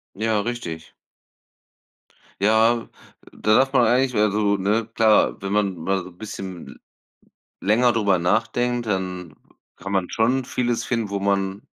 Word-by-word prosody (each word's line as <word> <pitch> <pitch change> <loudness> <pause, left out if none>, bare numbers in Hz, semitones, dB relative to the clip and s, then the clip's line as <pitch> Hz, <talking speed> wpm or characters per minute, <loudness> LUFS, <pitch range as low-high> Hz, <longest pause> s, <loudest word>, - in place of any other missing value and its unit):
Ja, 110 0 0
richtig. 100 -9 -6 1.5
Ja, 110 +3 +3
äh, - - -18 0.4
da 110 - +1
darf 135 +1 +3
man 135 - +4
eigentlich 125 +1 +2
also, 105 -1 +2
ne, 105 +3 0
klar, 110 -2 +3
wenn 100 0 -4
man 100 -3 0
mal 95 +3 -1
so 90 - -10
'n 85 - -23
bisschen 95 -4 -7
l - - -14 0.8
länger 120 +4 +3
darüber 100 -5 +2
nachdenkt, 120 +6 0
dann 90 -3 -3
w - - -20 0.4
kann 100 +3 -7
man 95 -3 0
schon 125 +4 +1
vieles 120 -1 -1
finden, 115 -3 -2
wo 100 - -2
man 100 0 -1
105 Hz, 155 wpm, -22 LUFS, 95-115 Hz, 1.5 s, man